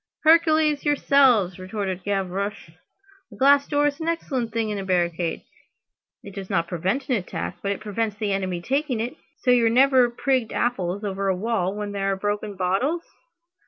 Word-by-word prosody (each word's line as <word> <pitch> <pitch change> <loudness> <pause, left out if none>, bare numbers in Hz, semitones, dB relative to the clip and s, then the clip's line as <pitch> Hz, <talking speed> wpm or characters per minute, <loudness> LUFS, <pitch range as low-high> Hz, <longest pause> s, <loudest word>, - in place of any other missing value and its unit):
"Hercules 315 -2 +4
yourselves!" 265 - +3
retorted 190 -1 -4
Gavroche. 195 -1 -3 0.6
"A - - -11
glass 280 +1 +4
door 290 0 +1
is 290 0 -1
an 320 - -4
excellent 270 -8 -2
thing 225 -1 -1
in 205 - -3
a - - -4
barricade. 175 -2 -1 0.8
It 200 - -10
does 195 -1 -7
not 170 -4 0
prevent 190 - -2
an 265 - +1
attack, 185 - -5
but 200 - -1
it 200 - -4
prevents 215 0 -2
the 210 -2 -2
enemy 185 -3 -2
taking 270 - -1
it. 235 +3 -3 0.3
So 250 - +3
you've 235 -2 +4
never 255 0 +5
prigged 250 -1 -1
apples 200 -4 -1
over 195 -1 -2
a 190 - +2
wall 200 -2 -1
where 210 0 -4
there 195 -1 -1
were 195 - +1
broken 205 +1 -3
bottles? 195 - 0
210 Hz, 175 wpm, -24 LUFS, 190-265 Hz, 0.8 s, never